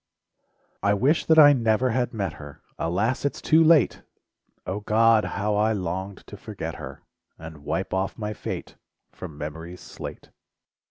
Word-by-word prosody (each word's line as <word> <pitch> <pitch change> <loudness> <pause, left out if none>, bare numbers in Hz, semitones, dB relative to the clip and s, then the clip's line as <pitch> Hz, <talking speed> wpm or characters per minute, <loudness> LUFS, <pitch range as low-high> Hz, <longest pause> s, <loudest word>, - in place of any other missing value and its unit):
I 100 0 +2
wish 135 - +2
that 160 - +5
I 145 -2 +9
never 115 0 +1
had 125 +1 0
met 100 -7 -3
her, 75 -1 -12 0.2
Alas, 100 +10 -1
it's 140 - -2
too 160 +1 +4
late! 160 -4 +4 0.6
O 95 +3 -3
God! 110 +1 +3
how 105 +1 0
I 110 +2 +2
longed 95 0 -4
to - - -11
forget - - -7
her, - - -9 0.3
And 80 -1 -10
wipe - - -3
off 95 +1 -2
my 105 -1 -4
fate - - -7 0.3
From 75 - -10
memory's 80 +4 -7
slate. - - -9
105 Hz, 155 wpm, -25 LUFS, 90-120 Hz, 0.6 s, I